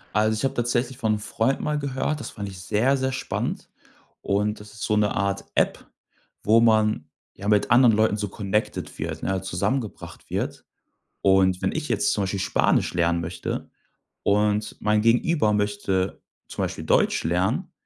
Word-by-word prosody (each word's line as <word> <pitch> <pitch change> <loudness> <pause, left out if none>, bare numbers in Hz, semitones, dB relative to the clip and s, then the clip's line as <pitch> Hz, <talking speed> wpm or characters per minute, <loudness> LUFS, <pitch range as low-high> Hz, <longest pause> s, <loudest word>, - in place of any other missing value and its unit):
Also, 110 +1 +3
ich 110 - -4
habe 135 - +1
tatsächlich 120 +1 -1
von 110 -4 +1
'nem 105 - -2
Freund 115 +5 0
mal 150 0 -1
gehört. 140 +2 -2
Das 115 - -6
fand 100 -2 -6
ich 95 -2 -9
sehr, 125 +9 +2
sehr 130 0 -1
spannend. 135 +1 -3 0.5
Und 105 +2 0
das 105 0 -12
ist 105 - -8
so 105 - +1
'ne 105 -1 +2
Art 100 0 -1
App, - - 0 0.5
wo 110 +2 +5
man, 110 -8 +2 0.2
ja, 100 - -7
mit 105 0 +2
anderen 120 -2 +6
Leuten 110 -1 +3
so 105 -1 -3
connected 105 +1 -3
wird, - - -4
ne, 95 -1 -1
zusammengebracht 105 +7 -3
wird. - - -3 0.6
Und 95 -1 +3
wenn - - +1
ich 155 -1 -3
jetzt 210 0 +1
zum 100 - 0
Beispiel 95 +1 -2
Spanisch 95 - +1
lernen 85 -1 +1
möchte 85 +2 -5 0.5
und 105 +1 +1
mein 105 0 +2
Gegenüber 115 +1 +3
möchte 100 -2 -1 0.3
zum - - -3
Beispiel - - -4
Deutsch - - +2
lernen, 90 +4 0
105 Hz, 170 wpm, -24 LUFS, 100-115 Hz, 0.6 s, anderen